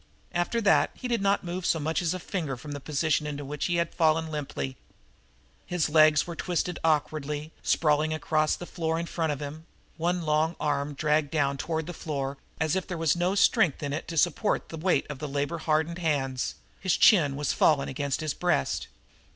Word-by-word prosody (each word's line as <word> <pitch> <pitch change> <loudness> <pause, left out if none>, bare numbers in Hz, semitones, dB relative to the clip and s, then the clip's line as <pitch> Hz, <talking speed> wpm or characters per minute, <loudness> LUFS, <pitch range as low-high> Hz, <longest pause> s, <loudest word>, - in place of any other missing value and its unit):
After 175 +7 0
that 200 -3 +4
he 255 - -5
did 235 -4 0
not 200 0 +2
move 180 +1 -4
so 170 - +2
much 160 +2 -1
as 175 +1 0
a - - -4
finger 160 -8 -3
from 145 +4 -9
the 145 - -4
position 150 +1 0
into 145 -1 -5
which 145 +1 -3
he 175 - 0
had 170 -1 0
fallen 160 -1 +2
limply. 135 - -4 0.9
His 175 -4 0
legs 155 -1 +6
were 170 - -6
twisted 180 0 -2
awkwardly, 150 -1 0
sprawling 155 0 +2
across 155 0 +1
the 175 - -8
floor 165 -2 -2
in 170 - -2
front 165 -2 -1
of 145 - -3
him; 155 +3 -7 0.3
one 175 +1 0
long 155 +2 +1
arm 145 -1 -1
dragged 150 0 +1
down 140 -2 +1
toward 160 +1 -2
the 175 - -6
floor, 140 -4 -4 0.2
as 160 +1 +1
if 190 - -2
there 180 - -4
was 165 -1 +2
no 175 +3 +1
strength 195 - +3
in 140 0 -2
it 155 - -4
to 165 - -5
support 175 +6 +1
the - - -6
weight 170 -3 +1
of 145 -3 -7
the 150 - -4
labor 145 +4 -2
hardened 160 +2 0
hands; 135 -6 -1 0.2
his 185 -2 +1
chin 155 -10 +5
was 145 -1 -1
fallen 145 -3 +3
against 140 +2 -2
his 155 -2 -1
breast. 175 - 0
155 Hz, 200 wpm, -27 LUFS, 145-170 Hz, 0.9 s, legs